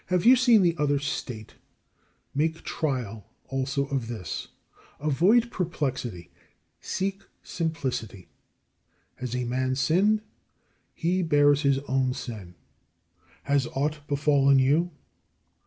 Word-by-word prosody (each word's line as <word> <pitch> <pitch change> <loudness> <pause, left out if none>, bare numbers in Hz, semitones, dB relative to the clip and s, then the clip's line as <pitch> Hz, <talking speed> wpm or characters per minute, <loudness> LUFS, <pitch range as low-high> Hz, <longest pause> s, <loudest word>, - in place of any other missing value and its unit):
26. 180 0 +1
You 240 - +9
have 260 - +6
seen 240 -4 +6
the 170 -2 +3
other 145 -1 +2
state, 130 -5 -5 0.8
make 160 +3 -1
trial 120 -9 -3 0.2
also 135 +1 -1
of 135 -5 -2
this. 100 -10 -5 0.5
Avoid 190 - +3
perplexity; 130 - -3 0.5
seek 195 +1 -3 0.2
simplicity. 130 - -3 0.9
Has 125 -1 -4
a 125 - -1
man 130 +2 -1
sinned? 190 +11 +2 0.7
He 180 +2 0
bears 145 -3 +4
his 140 -2 +3
own 130 -1 +1
sin. 100 -7 -7 0.9
Has 140 -3 +1
aught 150 +3 0
befallen 140 -1 +3
you? 145 +7 +3
140 Hz, 110 wpm, -26 LUFS, 130-165 Hz, 0.9 s, You